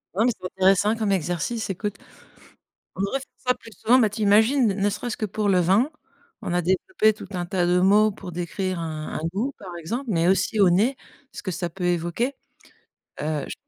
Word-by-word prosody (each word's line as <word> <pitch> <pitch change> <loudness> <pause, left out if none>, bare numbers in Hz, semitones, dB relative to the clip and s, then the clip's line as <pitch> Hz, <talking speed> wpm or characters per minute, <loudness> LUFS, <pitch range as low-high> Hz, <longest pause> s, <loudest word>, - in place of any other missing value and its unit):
Non, 215 +4 +3
mais 245 - +4
c'est - - -11
intéressant 190 +4 +3
comme 215 -3 -1
exercice, 180 +6 -2
écoute. 205 +2 -3 1.0
On 190 - -7
devrait 200 +8 -1
faire 270 - -11 0.2
ça 250 - +4
plus 225 -2 -15
souvent, 235 +5 +3
mais 220 -5 +3
tu 215 +1 -4
imagines 220 +6 +4
ne 200 0 +1
serait-ce 235 +2 -4
que 215 - -3
pour 210 +1 -1
le 185 -2 +4
vin, 195 - +3 0.5
on - - -3
a 180 - +2
développé 215 - +2
tout - - -10
un 175 -2 -3
tas 175 -1 0
de 180 0 +3
mots 210 +3 +5
pour 190 -2 -9
décrire 180 +2 -3
un 155 -2 -5
un - - -3
goût 235 +9 -2
par 180 -3 -9
exemple, 230 - -4
mais 170 -3 +2
aussi 205 +2 +2
au 195 - +7
nez, 215 +10 +2 0.4
ce - - -8
que 185 - -3
ça 175 0 -3
peut 180 +2 -6
évoquer, 175 +9 0 0.9
heu, 150 -2 -2
j - - -5
195 Hz, 210 wpm, -24 LUFS, 175-220 Hz, 1.0 s, au